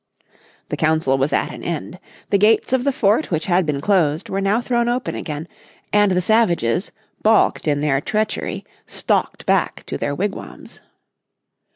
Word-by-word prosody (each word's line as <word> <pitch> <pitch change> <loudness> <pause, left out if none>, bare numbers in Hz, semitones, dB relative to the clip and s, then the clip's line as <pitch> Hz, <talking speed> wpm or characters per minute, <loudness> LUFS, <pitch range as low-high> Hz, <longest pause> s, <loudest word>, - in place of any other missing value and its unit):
The - - -3
Council 155 -4 +2
was 135 +3 +1
at - - 0
an - - -9
end. 170 +2 -5 0.3
The 200 - +4
gates 220 +4 +3
of 260 0 +1
the 280 - +3
fort 225 +3 +1
which 160 -2 -1
had 180 -2 +2
been 145 -2 -1
closed 165 -2 +1
were 195 - -1
now 200 +3 +2
thrown 240 -1 0
open 250 +1 -2
again, 150 0 -5 0.5
and 205 -1 +4
the 180 - +2
savages, 180 - +1 0.3
balked 220 -6 +3
in 145 -1 +1
their 140 -2 +1
treachery, 215 +6 -2 0.2
stalked - - -1
back - - 0
to - - -5
their 145 - -2
wigwams. 200 +5 -6
185 Hz, 165 wpm, -20 LUFS, 150-215 Hz, 0.5 s, The